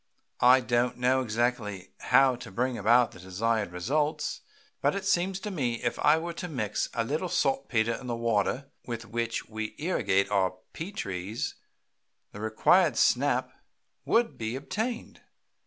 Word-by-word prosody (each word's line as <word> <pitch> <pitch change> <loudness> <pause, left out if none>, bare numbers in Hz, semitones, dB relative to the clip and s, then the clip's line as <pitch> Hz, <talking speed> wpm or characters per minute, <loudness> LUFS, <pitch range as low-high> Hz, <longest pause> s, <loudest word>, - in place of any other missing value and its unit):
I 130 +1 +6
don't 125 0 0
exactly 120 -4 +1
know 90 - -13 0.2
how 130 0 +5
to 125 - -9
bring 125 +5 -1
about 120 +1 +4
the - - -13
desired 100 +3 -1
results, 145 - -1 0.4
but - - +2
it 200 -1 -4
seems 190 0 +1
to 210 - -4
me 130 -10 -1
if 120 - -1
I 150 +2 +5
were 170 +1 -4
to 180 +2 -5
mix 110 - -2
a 115 - +1
little 155 +9 -2
saltpetre 120 -6 +1
in 125 - -7
the 120 - -1
water 115 +4 0
with 115 -1 -5
which 115 0 -3
we 110 -1 -5
irrigate 100 - +1
our 95 -2 +2 0.2
pea 170 +5 -5
trees 95 - -4 0.8
the 105 - -10
required 125 - +3
snap 130 -1 +2 0.5
would 230 0 +1
be 110 +1 -3
obtained. 220 - -4
125 Hz, 155 wpm, -28 LUFS, 110-145 Hz, 0.8 s, I